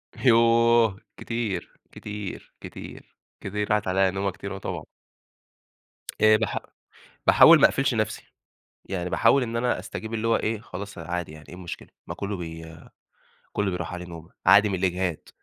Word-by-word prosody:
يوه! 115 -3 +4 0.2
كتير، 115 -4 -4
كتير، 105 -2 -8
كتير، - - -9 0.5
كتير، 105 +1 -3
راحت 105 -1 +1
عليّا 95 +1 +2
نومة 95 +1 -1
كتير، 100 +1 -7
آه - - -6
طبعًا. 95 - -5 1.4
إيه 110 0 +6
باح 110 -2 -2 0.7
باحاول - - +8
ما - - +6
أقفلش - - 0
نفسي، - - -1 0.6
يعني 90 -2 -4
باحاول 140 - +4
إن 115 -1 -3
أنا 125 +1 0
أستجيب 110 +1 -6
اللي 115 +1 -1
هو 115 - +4
إيه 110 -1 -2
خلاص 100 -2 -8
عادي 85 -1 -4
يعني 75 0 -14
ايه - - -10
المشكلة 90 -2 -8 0.2
ما - - -5
كُلّه 100 0 -4
ب 80 -2 -7 0.9
كُلّه 105 -2 0
بيروح 90 0 -4
عليه 90 0 -7
نومة، 85 0 -11 0.2
عادي 100 +3 +7
من 100 - -2
الإجهاد، 90 -2 -1
100 Hz, 155 wpm, -25 LUFS, 90-110 Hz, 1.4 s, باحاول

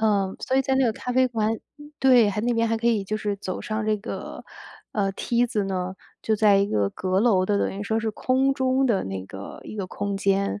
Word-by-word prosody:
嗯， 200 -3 +1
所 260 - 0
以 270 - +4
在 265 0 0
那 265 0 +3
个 225 - +2
咖 250 +3 -5
啡 255 +1 +4
馆 220 -2 0 0.5
对 250 -5 +6
还 205 +1 -1
那 240 +2 +1
边 230 0 +1
还 225 - +1
可 230 +1 +1
以 215 -4 +1
就 215 +2 -2
是 205 -1 -2
走 185 -2 -5
上 215 0 -3
这 215 - +2
个， - - -7 0.5
呃， 195 -2 0
梯 240 +4 +1
子 220 -4 -1
呢， 185 -1 -3 0.3
就 220 - +1
在 205 -1 +5
一 200 0 +3
个 100 - 0
阁 185 +1 -1
楼 200 -5 +3
的， 205 0 +2
等 195 - -1
于 - - -5
说 220 +2 0
是 220 0 -1
空 260 +5 +1
中 260 0 +1
的 215 -5 +1
那 95 -1 -5
个， 95 +1 -9
一 - - -9
个 195 -3 -3
空 200 +1 -3
间， 200 +1 0
215 Hz, 260 characters per minute, -24 LUFS, 195-235 Hz, 0.5 s, 对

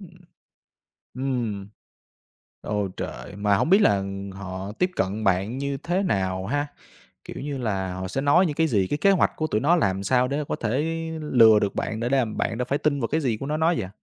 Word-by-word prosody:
Ừm. 190 -4 -12 1.0
Ừm. 120 -7 -2 0.9
Ôi 105 -2 -2
trời, 100 - -6
mà 100 0 +2
hổng 155 - 0
biết 195 +4 +6
là, 105 - +4
ừm, 100 0 -5
họ 95 0 -6
tiếp 180 +11 0
cận 100 +3 -1
bạn 95 +5 +1
như 140 0 -2
thế 175 +7 -1
nào 95 - -1
ha? 145 +6 -1 0.6
Kiểu - - -8
như 145 -1 -3
là 95 -7 -2
họ 95 0 -4
sẽ 130 +9 -2
nói 145 +7 +4
những 150 -4 -2
cái 160 +1 +2
gì, 100 -9 +1
cái 145 - -1
kế 195 +6 +4
hoạch 190 - +3
của 155 - -1
tụi 110 -7 0
nó 160 +6 +4
làm 100 - 0
sao 125 +5 +2
để 140 +3 -1
có - - 0
thể 120 +5 -1 0.4
lừa 115 -7 +6
được 100 -1 -1
bạn 110 - -2
để 120 +1 -1
đàm 130 -5 +1
bạn 110 - -1
đã 125 - -1
phải 140 +3 0
tin 145 -1 0
vào 115 - -1
cái 160 +2 0
gì 120 -6 0
của 135 - -6
nó 150 +2 -1
nói 165 +2 +2
vậy? 95 - -4
120 Hz, 225 wpm, -24 LUFS, 100-145 Hz, 1.0 s, biết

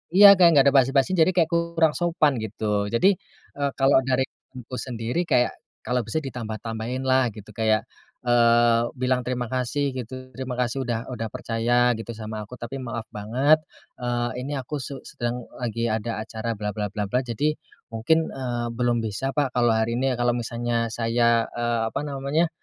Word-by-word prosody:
iya. 200 +1 +10
Kayak 175 -2 +8
enggak 140 -1 +6
ada - - -8
basa-basi, 135 +4 +2
jadi 165 +2 +5
kayak 165 -3 +3
kurang 170 -1 +2
sopan, 165 -5 +2
gitu. 105 -1 -2
Jadi, 185 +12 +4 0.5
eee, 140 0 +1
kalau 135 0 +5
dari 130 0 +2
temanku 130 -1 -11
sendiri, 120 +4 -2
kayak 120 -6 +3 0.3
"Kalau 125 0 0
bisa 115 +8 -1
ditambah-tambahinlah," 120 +2 -1
gitu. 105 -1 -11
kayak, 110 -1 +1 0.4
eee, 120 -1 +4 0.2
bilang 125 0 +1
terima 125 -1 -2
kasih, 130 +2 -1
gitu. 130 +1 -7
"Terima 130 -1 -4
kasih 125 +2 0
udah 115 +1 -3
udah 115 -2 -3
percaya 120 +2 +1
gitu, 115 +1 -6
sama 110 -1 -5
aku. 125 - -9
Tapi 120 +3 -6
maaf 115 -2 -5
banget, 125 +9 +3 0.4
eee, 120 0 -1 0.2
ini 145 - -4
aku 135 +3 -4
su 140 - -6
sedang 120 0 -4
lagi 115 -1 -2
ada 110 0 -2
acara 110 +1 -4
bla 105 0 -3
bla 105 -1 -1
bla 105 -1 -2
bla. 125 - +2
Jadi, 130 +5 -1 0.4
mungkin, 160 +9 +1
eee, 120 -3 -3
belum 120 0 +1
bisa 110 +5 -2
Pak, 145 -4 +1
kalau 120 -1 +3
hari 110 +1 0
ini 135 0 +1
ya. - - -2
Kalau 120 0 +2
misalnya 120 0 -1
saya" 115 0 +2
eee, 120 -1 0
apa - - -1
namanya, 145 +3 0
120 Hz, 175 wpm, -24 LUFS, 115-135 Hz, 0.5 s, iya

